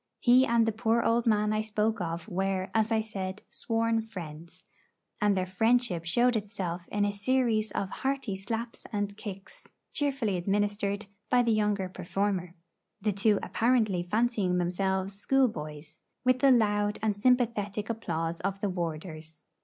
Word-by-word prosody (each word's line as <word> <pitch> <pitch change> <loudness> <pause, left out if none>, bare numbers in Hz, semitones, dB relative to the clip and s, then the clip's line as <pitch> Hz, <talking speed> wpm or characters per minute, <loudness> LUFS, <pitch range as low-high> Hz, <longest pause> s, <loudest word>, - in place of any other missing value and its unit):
He 255 +2 +5
and 230 -1 +3
the 225 - +1
poor 225 +1 +1
old 235 +1 +2
man 210 -1 +3
I 215 - +1
spoke 215 0 -1
of 165 -1 -4
were, 190 0 -1
as 220 0 +2
I 220 -1 +3
said, 195 -2 -5
sworn 225 0 0
friends; 170 -4 -9 0.6
and 205 -2 +3
their 185 - +1
friendship 205 -2 +1
showed 240 +8 +3
itself 185 -5 -4
in 205 0 0
a 205 - 0
series 220 0 +1
of 195 - -1
hearty 270 -7 -1
slaps 225 +4 -5
and 205 -2 -2
kicks 195 -2 -9 0.2
cheerfully 270 -9 0
administered 205 +2 0 0.2
by 245 -1 +4
the 235 - +2
younger 210 -3 +1
performer, 185 0 -2 0.4
the 210 0 0
two 200 +2 +3
apparently 225 -6 +2
fancying 205 -1 +1
themselves 190 +2 0
schoolboys, 160 - -1 0.2
with 255 0 +4
the 275 - +5
loud 210 -4 +3
and 215 -2 +1
sympathetic 215 -3 +1
applause 170 -7 -2
of 195 +1 -2
the 205 - -1
warders. 160 -2 -5
205 Hz, 150 wpm, -29 LUFS, 185-225 Hz, 0.6 s, He